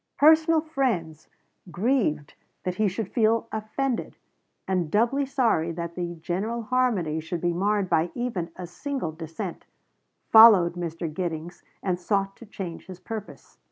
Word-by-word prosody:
Personal 315 +2 +5
friends, 235 - -2 0.4
grieved 180 - 0 0.3
that 180 - -1
he 215 - +3
should 195 +1 -3
feel 230 0 +2
offended, 230 +4 -2 0.5
and 180 -4 0
doubly 240 - +2
sorry 230 - +1
that 170 0 -5
the 175 0 -4
general 195 +8 -3
harmony 215 -11 +1
should 160 +2 -4
be 175 +1 0
marred 200 +2 +1
by 165 0 +2
even 230 -9 -3
a 180 - -6
single 220 - -4
dissent, 165 +3 -7 0.6
followed 215 -7 +8
Mr. 170 -1 -4
Giddings, 170 0 -4 0.2
and 180 -2 0
sought 195 +1 -1
to 235 - -13
change 180 -5 -7
his 185 -1 -9
purpose. 220 -1 -9
190 Hz, 140 wpm, -26 LUFS, 170-230 Hz, 0.6 s, followed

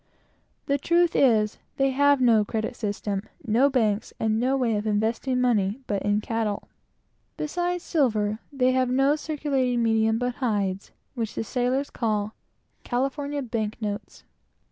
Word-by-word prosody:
The 280 0 +1
truth 340 +3 +2
is, 220 -5 +3 0.2
they 270 0 +2
have 285 +1 +4
no 230 -4 +5
credit 220 +3 -3
system, 205 -2 -3 0.2
no 240 +6 +4
banks, 220 -6 0
and 220 0 +1
no 260 +3 +1
way 235 -4 +1
of 210 +1 -2
investing 225 +5 0
money 220 -3 +1
but 200 -4 -2
in 205 +1 +1
cattle. 220 -2 -2 0.7
They - - -2 1.3
have 255 -1 +1
no 270 +3 +3
circulating 275 -6 -1
medium 225 0 +2
but 245 +1 -1
silver - - -5
and 235 -3 +2
hides 190 +1 -5 0.2
which 230 -4 -4
the - - -2
sailors 255 +5 -1
call 215 -2 -1 0.5
"California 280 +3 -2
bank 225 -2 -3
notes." 210 -2 -5
235 Hz, 145 wpm, -25 LUFS, 215-265 Hz, 1.3 s, no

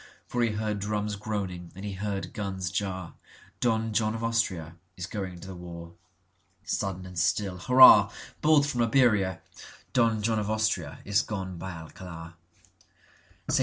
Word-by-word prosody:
For 120 - -2
he 115 -2 +2
heard 105 -1 -2
drums 105 0 -2
groaning 100 -5 -4
and 95 +2 -7
he 100 - -4
heard 100 +1 -4
guns 95 -5 -3
jar,(Don 100 +4 -3
John 110 0 +1
of 115 - -5
Austria 95 -8 -1 0.2
is 90 - -4
going 95 -3 -5
to 95 - -9
the 95 - -7
war.)Sudden 90 +2 -7
and 90 -1 -6
still—hurrah! 100 +4 +6 0.3
Bolt 150 -2 +5
from 125 -4 -1
Iberia! 110 -6 +3 0.5
Don 115 -3 +2
John 110 0 +1
of 105 - -2
AustriaIs 105 -3 0
gone 95 -4 -4
by 95 - -5
Alcalar.St. 80 0 -9
100 Hz, 130 wpm, -28 LUFS, 90-110 Hz, 0.5 s, still—hurrah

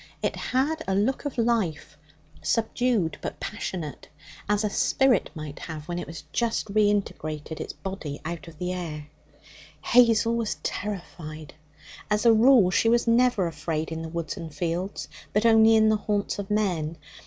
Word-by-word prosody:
It - - 0
had 295 +5 0
a 190 - +1
look 220 +9 0
of 285 - -4
life 195 -11 0 0.5
subdued, 230 -5 0
but - - -5
passionate 175 -8 -5 0.4
as 210 0 +2
a 210 - +1
spirit 265 -3 +2
might 155 -2 -7
have 155 -2 -7
when 175 0 -3
it - - -6
has 165 -3 -8
just 225 -3 -1
reintegrated 190 -7 0
its - - -5
body 190 -7 -6
out 170 0 -5
of 165 -2 -12
the 180 +2 -2
air. 155 -4 -6 0.7
Hazel 230 -2 +4
was 230 -2 -1
terrified. 165 -6 -5 0.6
As 210 +2 +1
a 230 - +8
rule, 225 -4 +6
she 225 - +3
was 235 +1 +3
never 235 -4 +4
afraid 160 0 -3
in 160 0 -4
the 165 - -5
woods 170 -1 -4
and 165 -1 -7
fields, 175 +5 -3 0.3
but 210 +2 +2
only 225 0 +7
in 220 0 +5
the 215 - +3
haunts 205 -1 -2
of 200 - -5
men. 175 -7 0
195 Hz, 165 wpm, -26 LUFS, 160-225 Hz, 0.7 s, a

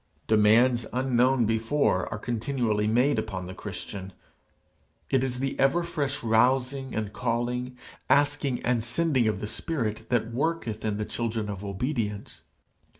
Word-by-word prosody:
Demands 110 +3 +4
unknown 130 -1 +3
before 115 -2 +1
are - - -3
continually 115 -2 -1
being 110 - +1
made 130 0 +3
upon 95 -4 -4
the 90 - -7
Christian: 95 0 -7 1.0
it 130 -1 +3
is 125 -2 -2
the 135 +1 -2
ever 155 +6 +3
fresh 145 -6 -2
rousing 125 +4 +2
and 105 -1 -3
calling, 125 +1 -2 0.3
asking 145 -3 +2
and 120 -2 +1
sending 130 0 +2
of 110 - -1
the - - -2
Spirit 115 -6 -3
that 115 -2 0
worketh 130 -6 -2
in 105 -2 -1
the 105 - -2
children 110 -2 -3
of 100 -1 -5
obedience. 105 0 -3
120 Hz, 145 wpm, -27 LUFS, 110-135 Hz, 1.0 s, Demands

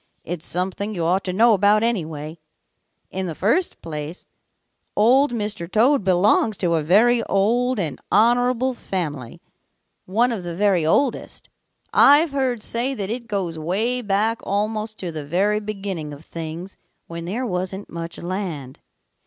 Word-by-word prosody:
"It's 170 -2 -4
something 190 +4 -2
you 170 -2 -1
ought 185 +4 +1
to 185 - -1
know 225 +5 +5
about, 210 +2 +4
anyway. 160 -8 -3 0.7
In 190 0 -3
the 165 - -5
first 265 - 0
place, 155 +1 -6 0.7
Old 255 +6 +4
Mr. 210 -6 -4
Toad 250 +4 +3
belongs 195 +3 +3
to 175 -3 0
a 160 - +2
very 225 +9 +4
old 240 +5 +1
and 160 -7 -3
honorable 245 +4 +3
family, 150 - -5 0.6
one 230 +6 +2
of 210 -6 -4
the 170 -1 -5
very 195 -3 +2
oldest. 265 - 0 0.4
I've 290 +3 +6
heard 260 -5 -1
say 250 +4 0
that 200 -3 -4
it 235 0 -5
goes 185 -6 -3
way 215 +10 0
back 215 +2 0
almost 215 +2 -2
to 180 -3 -4
the 155 -2 -5
very 195 +8 +1
beginning 195 -7 -5
of 145 +2 -12
things 165 +3 -7 0.3
when 170 0 -7
there 225 +9 -3
wasn't 190 -1 -3
much 165 0 -7
land. 170 -8 -5
200 Hz, 150 wpm, -22 LUFS, 170-230 Hz, 0.7 s, I've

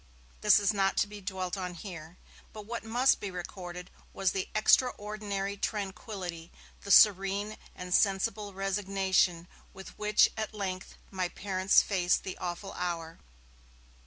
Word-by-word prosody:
This 210 - +6
is 205 0 +2
not 195 -1 +1
to - - +4
be 205 0 -10
dwelt 185 -1 -3
on 180 -2 -4
here. 170 -2 -9 0.4
But 215 -1 -9
what 235 +2 -5
must 240 +4 +3
be 200 - -4
recorded 180 0 -7 0.2
was 190 -1 +1
the 190 -1 -3
extraordinary 210 -3 +1
tranquillity, 190 -4 -5 0.3
the 200 - -9
serene 200 +1 +5 0.2
and 180 0 -5
sensible 200 +1 +1
resignation, 190 -3 0 0.3
with 190 0 -9
which 210 0 +4
at 220 -1 -4
length 190 -2 -5 0.2
my 185 -2 -2
parents 190 +1 +2
faced 180 -3 +1
the 190 - -5
awful 175 +3 -5
hour. 165 -2 -4
195 Hz, 135 wpm, -30 LUFS, 180-205 Hz, 0.4 s, This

